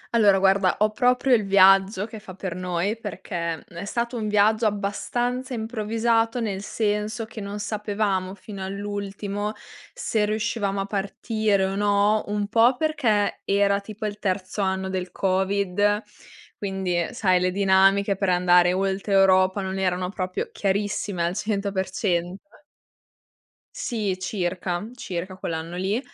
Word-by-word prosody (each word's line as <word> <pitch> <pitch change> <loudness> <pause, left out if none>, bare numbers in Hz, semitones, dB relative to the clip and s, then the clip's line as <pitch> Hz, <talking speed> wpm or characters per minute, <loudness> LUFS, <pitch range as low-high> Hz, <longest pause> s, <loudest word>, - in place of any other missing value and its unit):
Allora 205 -4 +5
guarda, 190 -1 +3
ho 215 +1 +2
proprio 250 +3 +2
il 225 -3 +4
viaggio 195 0 +5
che 220 0 -9
fa 190 -3 -11
per 190 -2 -4
noi, 180 +3 -1
perché, 175 -6 -4
mhmm, 170 - -14
è 200 - -5
stato 235 +3 -2
un 220 -2 -2
viaggio 215 +2 +3
abbastanza 245 +5 -2
improvvisato, 225 +1 0
nel 200 -4 -2
senso 210 +2 -2
che 220 -1 -9
non 200 +1 -5
sapevamo 205 -3 -2
fino 200 0 -8
all'ultimo 205 +1 -4 0.4
se 225 - 0
riuscivamo 215 -2 -1
a - - -2
partire 200 0 0
o 190 - -2
no. 205 +1 +2
Un 205 0 -1
po' 235 +4 +4
perché 250 -10 +1
era 200 0 +2
tipo 215 +1 -7
il 210 0 -4
terzo 185 +1 -2
anno 190 -1 -1
del 185 -1 -3
covid, 200 +2 +1 0.6
quindi, 190 -3 -2
ehm, 170 -1 0
sai 190 -7 +2
le 180 0 +1
dinamiche 195 +1 +3
per 195 0 -1
andare 180 0 +4
oltre 195 +2 -1
Europa 190 0 +4
non 190 0 -3
erano 180 -1 0
proprio 185 -2 -4
chiarissime 200 -2 -1
al 170 - -1
100%. 195 - -2 1.3
Sì 215 - -2
circa, 185 0 -2
circa 185 -5 -5
quell'anno 165 -1 -5
lì, 195 +5 0
200 Hz, 140 wpm, -24 LUFS, 190-215 Hz, 1.3 s, Allora